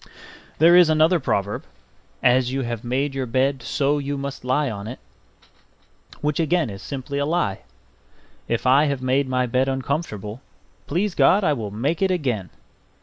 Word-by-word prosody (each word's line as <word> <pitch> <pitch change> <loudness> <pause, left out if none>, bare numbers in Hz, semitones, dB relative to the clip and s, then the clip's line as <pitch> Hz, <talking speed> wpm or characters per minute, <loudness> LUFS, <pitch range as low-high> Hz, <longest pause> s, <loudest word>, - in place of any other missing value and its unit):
There 170 +3 +6
is 180 -2 +7
another 160 +3 +4
proverb, 100 -7 -1 0.6
"As 125 0 +3
you 135 +1 -1
have 120 -3 -4
made 135 +4 -1
your 135 -1 -3
bed, 130 +2 0
so 145 +4 0
you 140 0 -3
must 140 -1 -6
lie 130 +4 +1
on 105 -3 -5
it"; 125 - -6 1.2
which 150 +1 -1
again 165 -5 +1
is 100 -1 -9
simply 140 +3 -5
a 140 - 0
lie. 155 - 0 0.9
If 115 +1 -2
I 135 +4 +5
have 140 -3 -2
made 130 +1 +1
my 125 0 +1
bed 125 +2 +1
uncomfortable, 130 - -3 0.5
please 185 +6 0
God 200 +3 +4
I 155 - +3
will 110 -6 -4
make 130 - -2
it 195 - +3
again. 125 - -1
135 Hz, 165 wpm, -22 LUFS, 125-150 Hz, 1.2 s, is